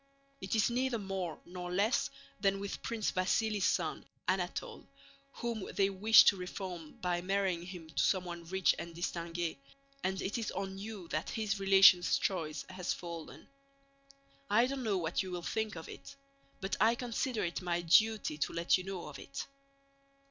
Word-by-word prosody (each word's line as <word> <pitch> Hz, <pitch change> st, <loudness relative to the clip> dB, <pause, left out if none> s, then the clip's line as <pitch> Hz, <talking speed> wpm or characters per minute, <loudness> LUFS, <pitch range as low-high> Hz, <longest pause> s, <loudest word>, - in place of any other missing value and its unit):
It 190 Hz, +3 st, -2 dB
is 220 Hz, +2 st, +3 dB
neither 250 Hz, 0 st, +1 dB
more 190 Hz, -5 st, -4 dB
nor 180 Hz, 0 st, -6 dB
less 200 Hz, +6 st, +2 dB, 0.3 s
than 195 Hz, 0 st, +2 dB
with 200 Hz, 0 st, -5 dB
Prince 225 Hz, -3 st, -1 dB
Vasíli's 200 Hz, +2 st, +1 dB
son 165 Hz, -4 st, 0 dB, 0.2 s
Anatole, 180 Hz, -1 st, -2 dB, 0.5 s
whom 235 Hz, -4 st, -4 dB
they 195 Hz, 0 st, +3 dB
wish 210 Hz, +4 st, +8 dB
to -, -, +5 dB
reform 180 Hz, -3 st, -6 dB
by 175 Hz, -1 st, 0 dB
marrying 190 Hz, -2 st, 0 dB
him 180 Hz, -3 st, -8 dB
to 140 Hz, -3 st, -1 dB
someone 175 Hz, -3 st, 0 dB
rich 190 Hz, +2 st, +2 dB
and 170 Hz, -1 st, -7 dB
distinguée, 170 Hz, -1 st, -3 dB, 0.5 s
and 190 Hz, 0 st, -1 dB
it 205 Hz, +5 st, -2 dB
is 225 Hz, -, -2 dB
on 195 Hz, 0 st, -4 dB
you 205 Hz, -4 st, -7 dB
that 155 Hz, 0 st, -2 dB
his 215 Hz, -2 st, -1 dB
relations' 195 Hz, -2 st, +7 dB
choice 160 Hz, -5 st, -2 dB
has 185 Hz, -1 st, -3 dB
fallen. 170 Hz, -2 st, -8 dB, 1.0 s
I 230 Hz, +4 st, +5 dB
don't 270 Hz, +1 st, -3 dB
know 215 Hz, -5 st, +1 dB
what 165 Hz, -1 st, 0 dB
you 190 Hz, -, -5 dB
will 175 Hz, -1 st, -4 dB
think 220 Hz, +1 st, -2 dB
of 160 Hz, -, -7 dB
it, -, -, -10 dB, 0.5 s
but 195 Hz, +1 st, -1 dB
I 225 Hz, +2 st, +5 dB
consider 240 Hz, 0 st, -2 dB
it 170 Hz, +2 st, -2 dB
my 175 Hz, -1 st, -1 dB
duty 210 Hz, -2 st, +3 dB
to -, -, -1 dB
let 170 Hz, +2 st, +3 dB
you -, -, -5 dB
know 190 Hz, -2 st, -5 dB
of -, -, -9 dB
it. 275 Hz, -, -6 dB
190 Hz, 170 wpm, -33 LUFS, 175-210 Hz, 1.0 s, wish